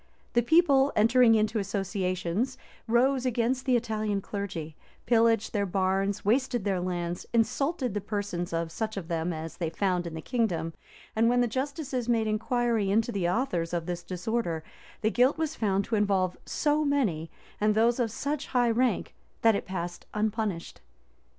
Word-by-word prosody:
The 240 - +4
people, 280 0 +4
entering 230 +2 +5
into 215 +1 +1
associations, 195 +3 -2 0.3
rose 250 +3 +3
against 250 +1 0
the 255 - +4
Italian 215 -3 0
clergy; 185 -6 -5 0.3
pillaged 225 -2 +3
their 200 -2 0
barns; 195 +2 0
wasted 245 +1 +1
their 195 -2 0
lands; 175 -1 -3
insulted 255 - +1
the 205 - -2
persons 200 -4 -3
of 165 0 -2
such 220 +3 -3
of 180 -3 -5
them 165 +1 -1
as 160 0 -6
they 170 -3 -1
found 180 -1 0
in 165 - -6
the - - -4
kingdom;[*] 175 -10 -1 0.4
and 225 +1 +4
when 245 0 +3
the 245 - +2
justices 260 0 -3
made 230 -2 +2
inquiry 225 -1 0
into 225 +4 +2
the 185 -5 0
authors 180 -6 -1
of 170 -1 -2
this 175 0 -3
disorder, 180 -2 -2 0.4
the 220 0 +2
guilt 255 +6 +3
was 320 -1 -1
found 200 -2 0
to 230 - -1
involve 195 -3 +1
so 300 +1 +1
many, 220 - 0 0.3
and 210 0 +2
those 230 +3 +3
of 235 -2 +1
such 285 +6 -3
high 245 -2 +2
rank, 245 +2 0 0.3
that 225 -2 +6
it - - -3
passed 175 -2 -5
unpunished. 215 -4 -2
215 Hz, 165 wpm, -28 LUFS, 185-245 Hz, 0.4 s, that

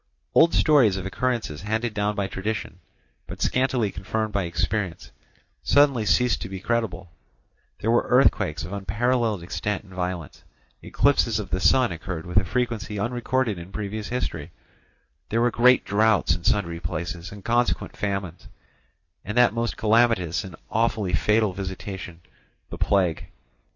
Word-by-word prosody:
Old 165 0 +5
stories 130 -11 +4
of 95 - -5
occurrences 110 -7 -2
handed 110 +3 -2
down 105 0 -1
by 100 -1 -1
tradition, 95 -1 -4 0.5
but - - -8
scantily 130 -5 +1
confirmed 110 +4 -3
by 100 -2 0
experience, 85 +2 -2 0.5
suddenly 140 -7 +3
ceased 125 +7 +2
to 95 - -5
be 95 - -5
incredible; 95 -5 -2 0.7
there 115 - 0
were 120 - +2
earthquakes 85 - +3
of 90 - -7
unparalleled 110 0 0
extent 105 +4 -3
and 95 -2 -16
violence; 90 -4 -5 0.4
eclipses - - +2
of - - -5
the 90 - 0
sun 125 +3 +4
occurred 85 0 -5
with 90 +1 -4
a 100 - +6
frequency 115 -2 -2
unrecorded 120 -1 -1
in 85 +3 -10
previous 105 +1 -4
history; 85 -11 -3 0.8
there 115 - +1
were 120 +1 +3
great 125 +2 +4
droughts 105 0 +3
in 85 - -6
sundry 85 -5 0
places 85 +1 -5
and 100 0 -11
consequent 120 +1 0
famines, 95 -4 -4 0.8
and 105 +4 -5
that 125 -3 +5
most 115 0 -2
calamitous 110 -8 +2
and 95 -4 -9 0.2
awfully 110 -4 0
fatal 105 +4 +2
visitation, 95 -2 -6 0.5
the - - -6
plague. 90 -5 +1
105 Hz, 145 wpm, -24 LUFS, 90-115 Hz, 0.8 s, a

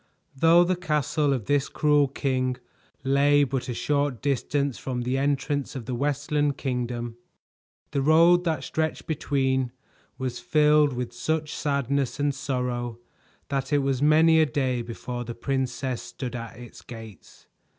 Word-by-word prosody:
Though 165 +5 +6
the 185 +1 +1
castle 150 -3 0
of 125 -6 -1
this 145 -1 +1
cruel 150 -1 +3
king 130 -2 -1 0.5
lay 140 +2 +4
but 135 -2 -2
a - - -1
short 145 -3 0
distance 140 0 -1
from 125 -2 -3
the 125 +2 -1
entrance 140 +1 -1
of 125 -4 -5
the 125 - -4
Westland 145 +2 0
Kingdom, 120 -3 -3 0.7
the 140 - 0
road 165 +4 +5
that 165 -3 -1
stretched 160 0 -2
between 130 -4 0 0.5
was 130 -2 -3
filled 150 -2 +4
with 125 -1 -4
such 155 -1 -2
sadness 140 -2 -1
and 145 0 +1
sorrow 125 -3 -3 0.5
that 140 +1 -2
it 145 -1 +3
was 135 -1 0
many 160 +2 +5
a 160 - +5
day 130 -4 0
before 120 +1 -5
the 120 0 -7
princess 130 -1 -2
stood 130 -2 -6
at 115 -2 -7
its 120 -1 -11
gates. 115 -5 -12
140 Hz, 150 wpm, -26 LUFS, 125-145 Hz, 0.7 s, Though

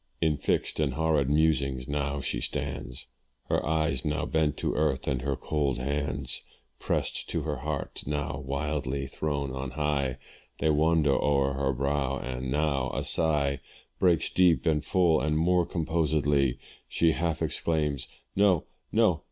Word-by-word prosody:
In 80 -2 +2
fixed 70 - 0
and 70 -4 0
horrid 80 -4 +2
musings 70 -4 +1
now 70 0 -1
she - - -2
stands, - - -4 0.4
Her - - +1
eyes 80 -4 0
now 75 0 -1
bent 80 -2 +1
to - - -1
earth, 75 -3 0
and 65 -3 0
her 70 +1 -1
cold 70 -3 -1
hands, 70 0 -2 0.4
Prest - - -1
to 85 - -1
her 75 -2 -2
heart, 70 +2 -3
now 75 0 -2
wildly 70 -1 -2
thrown 70 0 -2
on 65 0 -4
high, 70 -2 -1 0.4
They 80 - +2
wander 80 -1 +3
o'er 70 0 +2
her 70 0 0
brow 70 0 -1
and 65 0 -4
now 70 -2 0
a - - -1
sigh 70 -4 +1 0.4
Breaks 85 -4 +3
deep 90 -3 +4
and 75 -3 +2
full 85 -5 +3
and, 75 +1 +1
more 90 +1 +3
composedly, 75 -5 +1 0.3
She 85 -1 +3
half 80 0 -1
exclaims 75 -4 0 0.3
"No! 95 -5 +4 0.3
no! - - +3
75 Hz, 150 wpm, -28 LUFS, 70-80 Hz, 0.4 s, deep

